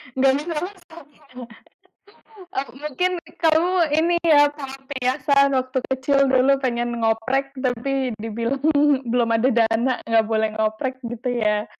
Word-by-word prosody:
Enggak 265 0 +3
bisa 335 +2 -5
masang 345 -4 -11
ya. 290 - -26 1.3
Oh, 270 +1 -2
mungkin 300 +7 -2 0.2
kamu 325 +2 +2 0.3
ini 345 +1 +2
ya 290 -3 +6
sangat 270 -1 -8
terbiasa 260 +1 -2 0.2
sewaktu 260 -1 -1
kecil 265 +2 +1
dulu 260 +1 +4
pengen 240 -1 -1
ngoprek 260 +5 0
tapi 255 0 -1
dibilang 230 +5 -3 0.5
belum 240 -1 +1
ada 245 +4 +2
dana, 230 +2 +2 0.2
enggak 225 -1 +3
boleh 220 0 +1
ngoprek 220 +4 -1
gitu 240 +2 -5 0.2
ya. 210 0 0
260 Hz, 130 wpm, -22 LUFS, 235-285 Hz, 1.3 s, ya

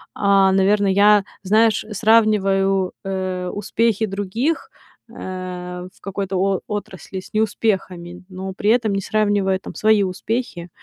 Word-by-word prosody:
А, 195 -1 +4
наверное, 195 +1 +3
я, 205 +1 +5 0.2
знаешь, 215 +2 +3
сравниваю, 195 -3 +2
э, 185 -1 -3
успехи 220 +1 0
других, 205 - -2 0.4
э, 180 -3 -7
в - - -27
какой-то 195 -1 -3
о 195 0 +1
отрасли 205 -3 -6
с 185 - -14
неуспехами, 190 -5 -2
но 190 0 -6
при 205 +2 -1
этом 230 -3 +2
не 195 - -1
сравнивая 205 -2 +1
там - - -10
свои 215 -1 +3
успехи, 185 -1 -4
195 Hz, 125 wpm, -20 LUFS, 185-215 Hz, 0.4 s, я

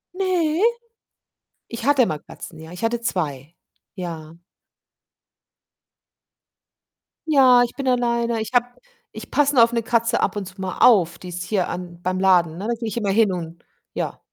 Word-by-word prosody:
Ne. 360 -4 0 1.1
Ich 230 0 -7
hatte 280 -3 +4
mal 155 - -3
Katzen, 160 - -12
ja. 160 +1 -11
Ich 180 - -9
hatte 230 +1 0
2. 155 - -3 0.4
Ja. 165 -4 -7 2.9
Ja, 260 -5 +6
ich 240 - -3
bin 275 -1 -4
alleine. 235 -2 +1
Ich 220 - -5
habe 245 -1 +4 0.5
ich - - -9
passe 290 0 +2
nur 235 - +7
auf 230 - +2
‘ne 230 -1 0
Katze 230 0 +1
ab 200 - 0
und 205 - -4
zu 190 +1 -13
mal 190 -1 -5
auf, 175 -8 +4
die 180 - -9
ist 180 0 -5
hier 185 0 -1
an 175 -1 -7
beim 185 +1 -2
Laden, 175 -4 +3
ne, 195 - -6
da 235 - 0
gehe 230 0 -5
ich 220 - -5
immer 205 -4 0
hin 210 -1 +3
und 170 -2 -6 0.3
ja. - - -4
210 Hz, 170 wpm, -22 LUFS, 175-240 Hz, 2.9 s, nur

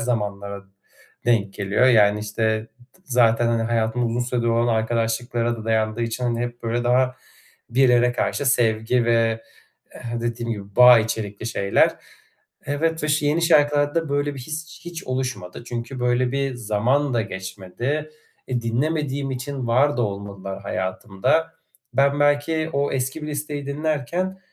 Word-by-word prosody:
zamanlara 100 -4 -3 0.6
denk 105 -5 +2
geliyor, 105 +5 +2
yani, 105 -4 +5
işte, 110 +1 0 0.4
ı - - -29
zaten, 120 -3 +3
hani, 115 -1 +1
hayatımda 115 +1 0
uzun 115 +2 -1
süredir 120 -1 -1
olan 115 +1 +2
arkadaşlıklara 115 +1 0
da 110 - -8
dayandığı 110 0 0
için, 115 +2 -2
hani, 120 -1 0
hep 120 0 -4
böyle 120 +1 -1
daha 125 +1 +2 0.5
bir 130 +2 +4
yere 125 0 +4
karşı 140 +2 -1
sevgi 115 -1 +2
ve, 115 -1 +2 0.5
eee, - - -11 0.2
dediğim 120 0 -3
gibi 100 -2 -9
bağ 125 -1 +9
içerikli 110 -1 -3
şeyler. 100 -3 +2 0.7
Evet 160 +3 -1
ve - - -1
ş 150 0 +2
yeni 155 +3 +1
şarkılarda 145 0 +3
böyle 145 0 0
bir - - -8
his 155 +2 -7
hiç 175 -1 -7
oluşmadı. 130 -7 -4
Çünkü 120 +2 -5
böyle 125 +1 +1
bir 135 -1 -1
zaman 120 +5 0
da 115 - +2
geçmedi. 100 +11 -4 0.4
E, 125 -2 -1
dinlemediğim 140 +3 -1
için 130 0 -4
var 135 +5 +3
da 120 - +1
olmadılar 100 -2 -5
hayatımda. 100 +12 -1 0.4
Ben 140 +2 +3
belki 150 +2 +2
o 140 0 0
eski 135 +4 -2
bir - - -4
listeyi 145 -1 -4
dinlerken, 155 +6 -2
120 Hz, 150 wpm, -23 LUFS, 110-140 Hz, 0.7 s, bağ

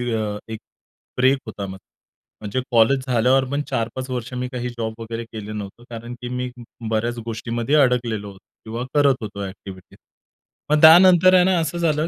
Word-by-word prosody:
अ, 105 -2 -2
एक 110 -1 -6 0.6
ब्रेक 130 +2 +4
होता 105 -3 -6
मग. 95 0 -8 0.6
म्हणजे 105 +4 -3
कॉलेज 120 +3 +4
झाल्यावर 130 +2 +3
पण 145 +1 0
4-5 130 0 -3
वर्षे 125 0 -4
मी 125 0 -3
काही 125 -1 -4
जॉब 115 -2 -4
वगैरे 115 +1 -5
केला 110 -2 -8
नव्हता, 105 +2 -8
कारण 120 +1 -7
की 120 - -5
मी 125 0 -3
ब 120 -1 -11
बऱ्याच 115 +2 -1
गोष्टींमध्ये 115 +3 -2
अडकलेलो 120 -5 0
होतो 95 - -16 0.3
किंवा 115 +2 -4
करत 145 -2 +4
होतो 100 -2 -6
ॲक्टिव्हिटीज. 95 -1 -11 0.7
मग 150 0 +3
त्यानंतर 180 +2 +8
आहे 180 -1 +6
ना, 185 0 +2
असं 165 +1 -2
झालं 160 -2 +1
120 Hz, 175 wpm, -21 LUFS, 110-135 Hz, 0.7 s, त्यानंतर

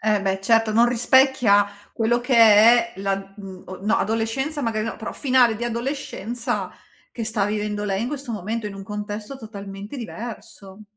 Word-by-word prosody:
Eh 210 -2 +1
beh 195 -1 -1
certo, 225 +2 +3
non 230 +2 +5
rispecchia 245 -4 +4 0.3
quello 235 +1 +1
che 250 +1 0
è 230 +1 +6
la, 195 0 -1
mh, 195 -1 -10
no 215 +2 +2
adolescenza 225 +8 -1
magari 215 -2 -1
no, 225 - -4
però 220 - -6
finale 255 -5 +3
di 240 - -4
adolescenza 240 -2 -3 0.4
che 230 - -5
sta 215 -3 0
vivendo 210 0 -2
lei 195 0 -1
in 240 - -2
questo 280 -3 -6
momento, 215 +1 -3
in 205 - -6
un 195 - -9
contesto 210 +4 -6
totalmente 205 -1 -9
diverso. 215 -4 -9
220 Hz, 165 wpm, -23 LUFS, 205-240 Hz, 0.4 s, è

